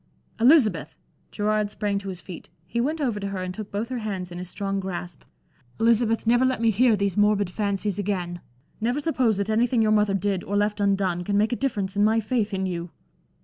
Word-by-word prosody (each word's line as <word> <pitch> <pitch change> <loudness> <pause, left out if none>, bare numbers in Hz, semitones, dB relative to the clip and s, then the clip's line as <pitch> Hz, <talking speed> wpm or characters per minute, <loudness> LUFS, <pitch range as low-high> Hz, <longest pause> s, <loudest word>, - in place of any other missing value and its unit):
"Elizabeth!" 225 - +4 0.3
Gerard 210 0 0
sprang 205 -1 -2
to 195 -1 -7
his 185 -2 -6
feet. 180 -2 -10 0.2
He 235 +7 -2
went 305 +6 -1
over 240 -8 -1
to 200 - -3
her 195 -2 -4
and 185 0 -4
took 210 +1 -7
both 210 +4 -3
her 255 -2 -3
hands 190 -5 -4
in 175 - -6
his 180 0 -6
strong 195 0 -2
grasp. 175 -4 -6 0.6
"Elizabeth, 230 0 +2
never 240 +2 +4
let 260 -2 +1
me 230 -1 +3
hear 230 +2 +4
these 200 -2 0
morbid 205 -2 +2
fancies 200 -1 -1
again. 180 -4 -2 0.4
Never 240 +5 0
suppose 255 -8 +1
that 200 0 -1
anything 230 +1 +2
your 215 - +2
mother 210 -2 +3
did 195 -1 -1
or 205 +2 -2
left 210 +1 0
undone, 195 -3 +1
can 200 +2 0
make 215 +3 +2
a - - +1
difference 205 -8 -2
in 205 - +3
my 220 +2 +4
faith 220 -1 -1
in 190 -1 -1
you!" 175 -1 -4
205 Hz, 215 wpm, -25 LUFS, 190-225 Hz, 0.6 s, Elizabeth